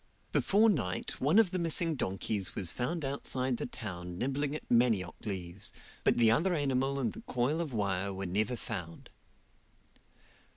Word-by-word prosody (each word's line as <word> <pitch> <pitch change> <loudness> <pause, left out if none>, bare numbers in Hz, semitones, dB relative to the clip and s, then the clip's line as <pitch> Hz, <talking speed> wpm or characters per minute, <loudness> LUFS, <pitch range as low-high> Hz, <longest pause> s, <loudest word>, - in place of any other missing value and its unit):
Before 210 +3 +4
night 120 - -1
one 150 +9 +4
of 220 -6 +5
the 185 - -1
missing 165 0 +1
donkeys 95 - -1
was 90 -5 +2
found 155 +5 -2
outside 130 -2 -1
the - - -3
town 90 -7 -6
nibbling 140 +5 -1
at - - -5
manioc 115 -7 +3
leaves, 95 -1 -5 0.3
but - - +3
the 115 -2 +6
other 175 +9 +2
animal 135 -2 0
and 120 -5 0
the - - -9
coil 130 +6 +1
of 160 -4 -3
wire 100 -3 0
were 95 0 -4
never 105 +7 0
found. 85 -7 -6
125 Hz, 160 wpm, -32 LUFS, 95-145 Hz, 0.3 s, the